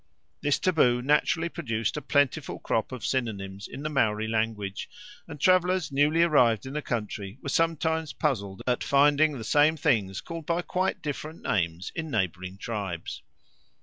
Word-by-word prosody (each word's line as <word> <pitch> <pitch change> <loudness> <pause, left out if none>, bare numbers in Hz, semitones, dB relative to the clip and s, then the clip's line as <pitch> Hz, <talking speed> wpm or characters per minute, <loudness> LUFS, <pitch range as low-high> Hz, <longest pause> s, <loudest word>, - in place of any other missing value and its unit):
This 145 -1 +2
taboo 125 -9 +2
naturally 150 +4 +2
produced 115 -10 -2
a 150 - -3
plentiful 145 +1 +1
crop 110 +2 -1
of 125 -4 -6
synonyms 100 -6 -3
in 135 - -8
the 155 - -1
Maori 110 -6 +1
language, 110 -3 -2 0.4
and 155 -3 -9
travellers 180 -1 +3
newly 150 +4 +3
arrived 125 - +3
in 130 - -6
the 150 - -2
country 105 -4 -4
were 140 - -3
sometimes 160 0 +1
puzzled 100 -10 -2
at 125 -1 0
finding 145 +1 +4
the 115 - -6
same 150 +6 +4
things 110 -11 +1
called 165 -2 -7
by 170 +1 0
quite 185 +2 -1
different 155 +2 -5
names 85 -1 -1
in 160 -1 -4
neighbouring 95 - -2
tribes. 100 -6 -5
135 Hz, 155 wpm, -27 LUFS, 110-155 Hz, 0.4 s, finding